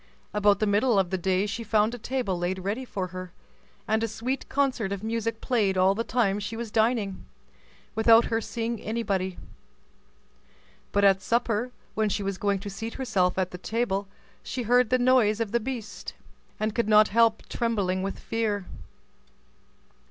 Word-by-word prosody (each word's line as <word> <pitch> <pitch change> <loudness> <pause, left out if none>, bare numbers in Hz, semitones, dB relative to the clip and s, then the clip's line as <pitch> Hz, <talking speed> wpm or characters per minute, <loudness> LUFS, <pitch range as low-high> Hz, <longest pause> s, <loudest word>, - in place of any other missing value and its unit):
About 205 -1 +4
the 215 - +1
middle 210 +3 +3
of 190 -2 +1
the 190 - +1
day 190 +2 +1
she 225 +3 -4
found 220 +1 +2
a 245 - -6
table 245 -5 -2
laid 175 +2 -2
ready 205 +7 -3
for 190 -6 -4
her, 185 0 -7 0.6
and 220 +1 +1
a - - +1
sweet 240 +5 -4
concert 265 -8 0
of 200 0 -4
music 225 0 -2
played 205 -6 +1
all 185 +1 +4
the 225 +3 -2
time 215 -4 +1
she 210 +2 -5
was 230 -2 -5
dining, 220 -3 +1 0.7
without 225 +1 +6
her 225 0 0
seeing 230 0 -3
anybody. 200 -5 -2 1.5
But 200 - +2
at 195 -1 +5
supper, 235 +1 0 0.2
when 215 -1 +1
she 205 +1 -1
was 195 -1 -3
going 200 -1 +1
to 205 - -6
seat 225 +4 -6
herself 190 -9 0
at 185 -1 0
table, 205 -4 -1 0.3
she 255 - -4
heard 245 +1 +3
the 255 - +4
noise 245 -4 +3
of 225 -3 -2
the 235 - +2
beast, 235 -3 -6 0.4
and 215 0 -1
could 235 -2 0
not 215 0 +6
help 230 0 +3
trembling 200 -6 -1
with 195 +1 -3
fear. 215 -4 -2
215 Hz, 170 wpm, -27 LUFS, 195-230 Hz, 1.5 s, without